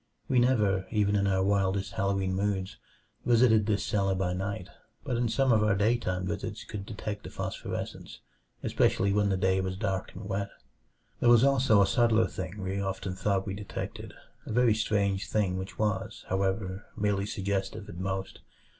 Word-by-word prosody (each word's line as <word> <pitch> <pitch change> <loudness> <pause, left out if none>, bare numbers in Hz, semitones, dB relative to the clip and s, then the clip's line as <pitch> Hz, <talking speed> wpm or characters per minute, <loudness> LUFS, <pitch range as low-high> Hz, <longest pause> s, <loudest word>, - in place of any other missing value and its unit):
We 130 - +3
never 105 -7 +2
even 105 -2 +2
in 100 0 +2
our 95 -1 +2
wildest 95 -1 +1
Halloween 95 -1 0
moods 95 -1 -1 0.5
visited 115 -3 +4
this 105 -2 +1
cellar 95 -2 +1
by 90 -1 0
night, 95 +1 -3 0.4
but 130 -4 -2
in 120 0 +1
some 130 +3 +2
of 110 - +4
our 105 -2 +3
daytime 100 -3 +1
visits 95 - -4
could 100 -1 -7
detect 105 -1 -5
the - - -7
phosphorescence, - - -5 0.4
especially 100 +1 +2
when 105 0 +2
the 95 - +1
day 95 0 +2
was 95 0 -3
dark 95 -1 -2
and 95 - -7
wet. 100 0 -2 0.7
There 120 - +4
was 120 0 +7
also 130 -7 +5
a - - +3
subtler 115 +2 +3
thing 95 +2 -6
we 95 +1 -2
often 95 -1 -3
thought 95 0 0
we 95 - -3
detected 100 0 -6 0.3
a - - -4
very 120 0 +4
strange 100 -3 0
thing 100 -4 +1
which 95 +2 -7
was, 105 -1 -2
however, 95 +1 -1
merely 100 -1 0
suggestive 100 +1 -3
at 85 - -9
most. 95 0 -3
100 Hz, 170 wpm, -29 LUFS, 95-110 Hz, 0.7 s, was